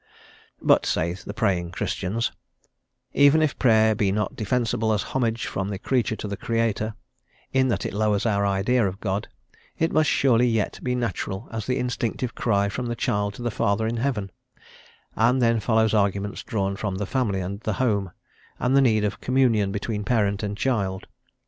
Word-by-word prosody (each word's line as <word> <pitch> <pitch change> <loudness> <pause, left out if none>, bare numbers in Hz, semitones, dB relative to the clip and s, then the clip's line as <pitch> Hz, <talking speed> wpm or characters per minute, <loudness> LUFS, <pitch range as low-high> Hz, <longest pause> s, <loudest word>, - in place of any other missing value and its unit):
But, - - +4
say 85 +2 0
the 95 +2 -8
praying 90 -5 -1
Christians, 105 +7 -2 0.8
even 145 +3 +5
if 150 - -1
Prayer 110 -3 +4
be 100 -2 +1
not 105 0 -1
defensible 110 0 0
as 105 - 0
homage 120 -3 -1
from 95 +1 -3
the 100 - -3
creature 120 +1 0
to 110 - -6
the 100 - -3
Creator, 110 -1 -1 0.6
in 130 0 +3
that 100 -5 -1
it - - -3
lowers 105 0 +1
our 100 -3 +1
idea 100 +4 +2
of 95 +1 -5
God, 100 -1 -2 0.5
it 165 - +1
must 155 0 +3
surely 125 -2 +3
yet 115 -4 -1
be 125 -1 -1
natural 110 -4 -3
as 110 -2 -4
the 130 0 0
instinctive 125 -1 -2
cry 100 -3 +1
from 120 +5 -4
the 120 - -2
child 100 -2 -1
to 120 - -8
the 120 - -1
Father 100 +1 0
in 115 +1 -1
heaven; 115 -6 -2 0.8
and 120 +3 +3
then 115 -2 +3
follow 110 0 +2
arguments 100 -1 0
drawn 100 -2 -2
from 100 -1 -3
the 100 +2 -2
family 110 -4 0
and 95 +2 -4
the 110 -1 -2
home, 100 -6 0 0.5
and 125 +2 +1
the 140 - +6
need 110 -5 +3
of 105 - -2
communion 120 -6 +2
between 105 +1 -3
parent 100 -3 +1
and 105 -1 -3
child. 100 -8 -1
110 Hz, 180 wpm, -24 LUFS, 100-120 Hz, 0.8 s, the